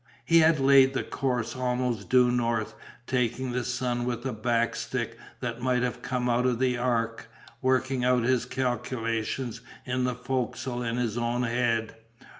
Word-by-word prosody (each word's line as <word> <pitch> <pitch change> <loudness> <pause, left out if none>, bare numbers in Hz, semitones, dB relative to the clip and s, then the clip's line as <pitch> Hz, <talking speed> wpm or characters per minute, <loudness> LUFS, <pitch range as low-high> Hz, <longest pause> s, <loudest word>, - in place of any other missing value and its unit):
He 165 0 +5
had 160 -1 +5
laid 135 0 +6
the - - 0
course 125 -4 -2
almost 125 -5 -1
due 125 -1 +5
north, 115 -3 0 0.3
taking 125 0 -1
the 125 0 -1
sun 125 0 -1
with 120 0 -3
a 130 - -1
back 115 +1 0
stick 115 -1 -3 0.3
that 120 -1 -4
might 125 -1 +1
have 125 - -2
come 125 -2 -2
out 125 +1 +2
of 125 -2 +1
the 130 0 +1
Ark, 115 -2 -1 0.3
working 130 0 +1
out 125 -1 +3
his 125 0 +2
calculations 120 -2 -2 0.2
in 125 0 -1
the 125 -1 -1
fo'c'sle 125 0 -3
in 115 - -2
his 120 -2 -1
own 120 +1 0
head. 115 -2 0
125 Hz, 165 wpm, -27 LUFS, 120-130 Hz, 0.3 s, laid